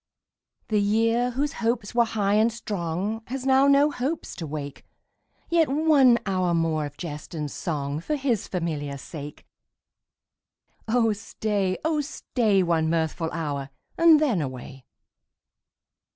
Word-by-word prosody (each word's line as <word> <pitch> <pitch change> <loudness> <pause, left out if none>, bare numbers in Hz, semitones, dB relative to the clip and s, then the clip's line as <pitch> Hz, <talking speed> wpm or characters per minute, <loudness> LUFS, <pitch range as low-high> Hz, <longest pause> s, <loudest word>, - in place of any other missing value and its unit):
The 210 -2 +2
year, 225 +4 +2
whose 275 +4 -2
hopes 230 -2 -1
were 235 0 +4
high 205 -3 0
and 220 +2 +4
strong, 205 0 -3
Has 260 +1 -5
now 270 +1 +5
no 280 +1 +5
hopes 285 +5 -3
to 165 - -5
wake; 145 -1 -6 0.6
Yet 330 -3 +3
one 280 -4 +5
hour 185 -3 +1
more 160 -2 0
of 145 - -14
jest 150 -1 -7
and 150 -3 -3
song 145 -6 -3
For 300 - -2
his 265 -7 -1
familiar 150 -6 -3
sake. 145 +1 -9 1.4
Oh 225 -1 +2
stay, 205 -3 -2
oh 315 -2 +1
stay, 225 -8 0
One 165 -2 +1
mirthful 165 0 -1
hour, 145 -4 -3 0.3
and 330 -2 +6
then 250 - +1
away. 130 -1 -7
205 Hz, 135 wpm, -25 LUFS, 160-250 Hz, 1.4 s, and